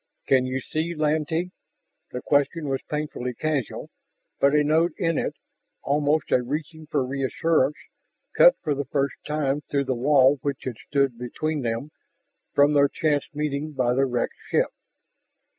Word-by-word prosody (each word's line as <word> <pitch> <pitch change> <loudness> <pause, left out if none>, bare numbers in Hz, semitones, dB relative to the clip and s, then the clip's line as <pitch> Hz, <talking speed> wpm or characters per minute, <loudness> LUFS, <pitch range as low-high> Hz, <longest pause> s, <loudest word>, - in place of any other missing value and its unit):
"Can 130 -1 +3
you 130 +1 -2
see, 160 +5 -3
Lantee?" 155 +3 0 0.6
The 125 - -6
question 145 +2 +1
was 135 -1 -1
painfully 150 -5 -3
casual, 150 -5 -3 0.5
but 140 +1 +4
a 150 - +4
note 160 +3 +2
in 165 -4 +1
it, - - -2 0.5
almost 145 +1 +1
a 125 - +4
reaching 155 +4 -5
for 145 -4 0
reassurance, 140 +2 +1 0.6
cut - - +7
for 150 - +1
the 140 0 -3
first 140 +1 0
time 150 -1 0
through 140 -1 0
the 130 - 0
wall 135 +2 +4
which 140 -1 -3
had 125 -4 -5
stood 140 -4 +1
between 150 +5 -3
them 120 +5 -3 0.6
from 145 +1 +5
their 140 -1 +5
chance 150 -2 0
meeting 150 0 -2
by 125 -3 +1
the 135 +2 +2
wrecked 125 -1 -1 0.2
ship. - - +2
145 Hz, 155 wpm, -25 LUFS, 135-155 Hz, 0.6 s, cut